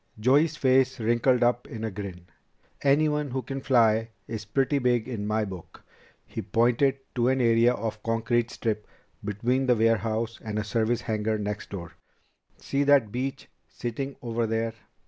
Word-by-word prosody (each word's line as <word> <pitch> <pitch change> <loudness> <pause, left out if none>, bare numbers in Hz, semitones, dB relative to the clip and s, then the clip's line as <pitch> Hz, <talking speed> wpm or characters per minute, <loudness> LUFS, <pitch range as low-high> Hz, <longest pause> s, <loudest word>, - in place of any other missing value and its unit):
Joey's 145 +7 +3
face 130 -1 +3
wrinkled 120 +2 +2
up 120 0 +1
in 110 -1 -7
a 110 - -2
grin. 95 -3 -7 0.6
"Anyone 150 +1 +2
who 130 0 -3
can 135 0 -5
fly 115 -4 +3 0.2
is 110 -1 -5
pretty 135 +7 +1
big 125 -3 +1
in 110 -5 -4
my 110 0 +1
book." 95 -4 -10 0.4
He - - -5
pointed 125 +4 +2 0.2
to 120 -1 +1
an 130 +1 +2
area 115 0 +4
of 110 -1 -4
concrete 115 +1 0
strip 105 -3 -3 0.4
between 120 +6 0
the 125 - +5
warehouse 115 0 +1
and 110 -2 -4
a 105 - 0
service 110 +2 0
hangar 110 0 -1
next 105 0 -4
door. 85 -4 -7 0.7
"See 140 +1 -1
that 140 -7 +4
Beech 130 +3 -4 0.2
sitting 135 +4 -4
over 115 -1 -1
there?" 115 0 -1
115 Hz, 160 wpm, -27 LUFS, 110-130 Hz, 0.7 s, the